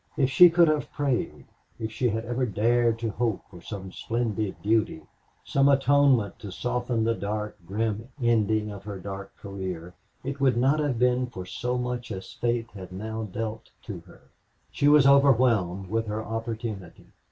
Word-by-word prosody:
If 135 -2 +2
she 180 +6 +9
could 170 0 +5
have 155 -1 0
prayed, 140 -4 -2 0.3
if 110 0 -4
she 125 +2 0
had 110 +1 -2
ever 120 +2 -1
dared 115 +2 +2
to 115 -1 -2
hope 115 -2 -1
for 90 -2 -12
some 95 0 -7
splendid 110 -3 -2
duty, 105 -7 +1 0.4
some 140 0 +3
atonement 135 -6 +3
to 105 -5 -8
soften 120 +2 -1
the 115 +1 +2
dark, 105 0 -3
grim 110 +3 -2
ending 110 -3 +2
of 100 -1 -9
her 100 -2 -5
dark 100 +1 -8
career, 95 -3 -6 0.3
it 140 +2 -4
would 130 -3 +3
not 135 +5 +3
have 145 -5 0
been 125 +1 +2
for 95 -7 -8
so 125 +6 -2
much 125 -1 -3
as 95 -2 -7
fate 120 -1 -1
had 95 -3 -9
now 110 +4 -4
dealt 110 +2 -5
to 100 -6 -6
her. - - -16 0.5
She 145 - +1
was 145 -1 +7
overwhelmed 120 -10 +4
with 115 0 0
her 110 +1 -3
opportunity. 115 -4 -5
115 Hz, 170 wpm, -26 LUFS, 105-125 Hz, 0.5 s, she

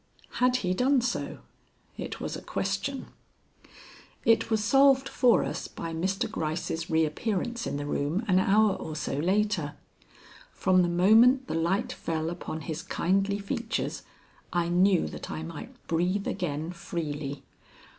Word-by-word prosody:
Had 250 0 +4
he 180 - +2
done 260 +7 +3
so? 240 0 -3 0.5
It - - -6
was - - -4
a - - -7
question. 195 +8 -2 1.2
It 225 0 +4
was 220 -2 +1
solved 270 +2 +5
for 250 -3 +4
us - - -4
by 165 -1 -6
Mr. 190 +4 -1
Gryce's 160 +1 -3
reappearance 190 +9 0
in - - -2
the 145 - -4
room 150 +9 -1
an 185 -1 +4
hour 205 +2 +4
or 155 -4 -6
so 150 - -3
later. 185 -3 0 0.8
From 185 -1 +3
the 175 - +2
moment 225 +9 +5
the - - -4
light 190 +10 0
fell 160 0 -2
upon 160 -2 -5
his 155 +2 -4
kindly 195 +3 0
features 220 +3 -3 0.5
I 170 -1 0
knew 180 +1 +3
that - - -7
I 160 - -4
might 170 - -7
breathe 180 +4 0
again 165 -3 -2
freely. 150 -5 -5
185 Hz, 145 wpm, -28 LUFS, 165-220 Hz, 1.2 s, solved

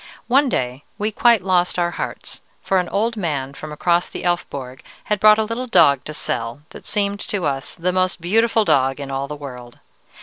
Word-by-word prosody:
One 270 +2 +3
day 125 - -2
we 210 +1 -1
quite 230 -2 +4
lost 180 -2 +1
our 175 -1 +1
hearts, - - -6 0.2
for 190 - +1
an 180 - -2
old 225 +3 0
man 145 -9 -2
from 155 +2 -8
across 170 +3 +1
the - - -7
Elfborg 140 -7 -3 0.2
had 210 -1 -1
brought 215 +1 +7
a 220 - +2
little 230 +4 -4
dog 160 - +5
to 155 - -5
sell, 115 +3 -3
that - - -12
seemed 200 -1 -1
to 195 -5 -3
us 135 -1 -2
the 180 +2 -1
most 185 -1 0
beautiful 220 +5 +2
dog 135 -3 +2
in 140 -1 -6
all 135 +1 -2
the 150 - -6
world. 125 -4 -10
175 Hz, 200 wpm, -21 LUFS, 140-210 Hz, 0.2 s, brought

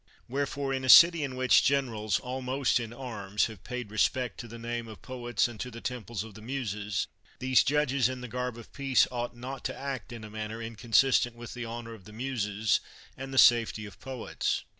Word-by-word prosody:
Wherefore, 140 +1 -2
in 130 0 -2
a 130 - -2
city 170 +2 +9
in 135 -2 -3
which 130 0 +5
generals, 115 -8 +1
almost 130 +1 0
in 115 -2 -5
arms, 110 -5 -2
have 110 -5 -9
paid 125 -4 -5
respect 125 +1 0
to 120 - -6
the 115 +1 -9
name 115 0 -4
of 110 - -11
poets 120 -3 -1
and 120 -3 -10
to 125 - -4
the 115 -1 -9
temples 115 -4 -4
of 110 -1 -11
the 110 - -12
Muses, 105 -5 -2 0.3
these 130 0 +4
judges 140 -3 +2
in 130 0 -5
the 125 - -6
garb 125 0 -3
of 115 - -12
peace 135 -2 +3
ought 120 -1 -4
not 130 +3 -6
to - - -3
act 135 -5 -5
in 115 -2 -8
a 110 - -8
manner 110 +1 -5
inconsistent 115 +2 +2
with 120 0 -9
the 125 -1 -5
honor 115 0 -6
of 100 -5 -13
the 105 - -12
Muses 110 -4 0 0.4
and 135 +1 -7
the 135 - -4
safety 115 -3 +5
of 100 - -12
poets. 130 -3 -2
120 Hz, 205 wpm, -29 LUFS, 110-130 Hz, 0.4 s, city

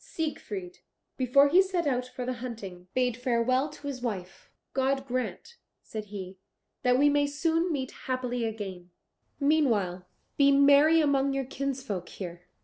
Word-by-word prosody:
Siegfried, 360 +3 -5 0.4
before 270 +2 +5
he 360 +6 +6
set 375 -3 -1
out 250 -3 0
for 250 0 -6
the 255 - -1
hunting, 195 -8 -7
bade 250 -2 +2
farewell 250 +3 +1
to 290 0 -13
his 275 -3 -4
wife: 190 -7 -5 0.2
"God 270 0 +1
grant," 255 - -4 0.3
said 215 -1 -6
he, 190 -2 -8 0.4
"that 250 0 +3
we 285 +2 +5
may 290 0 +3
soon 330 +4 0
meet 265 -4 -2
happily 250 -2 -3
again; 195 -5 -5 0.5
meanwhile 225 - +1 0.3
be 280 -1 +6
merry 285 +3 +6
among 280 -2 +2
your 270 -1 -1
kinsfolk 265 -9 -4
here." 175 -2 -8
260 Hz, 145 wpm, -28 LUFS, 225-285 Hz, 0.5 s, he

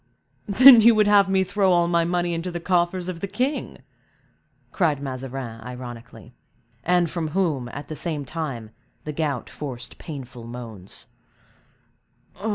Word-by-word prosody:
"Then, 245 +4 +9
you 230 +1 +6
would 215 -1 +4
have 200 -1 +5
me 190 0 +3
throw 195 0 +1
all 175 -1 +3
my 170 -1 +2
money 175 0 0
into 165 +2 -3
the 175 -1 -4
coffers 175 0 0
of 180 -2 -5
the 200 - -3
king!" 255 +9 -3 0.9
cried 155 -7 +1
Mazarin, 130 -4 -6
ironically; 125 -1 -10 0.5
and 175 0 +2
from 165 0 -3
whom, 155 -7 -1
at 145 +4 -8
the 155 - -6
same 150 -3 -3
time 130 -7 -5 0.3
the 150 - -5
gout 145 -5 -2
forced 125 -5 -7
painful 130 -6 -9
moans. 115 -6 -9
165 Hz, 145 wpm, -23 LUFS, 130-185 Hz, 0.9 s, Then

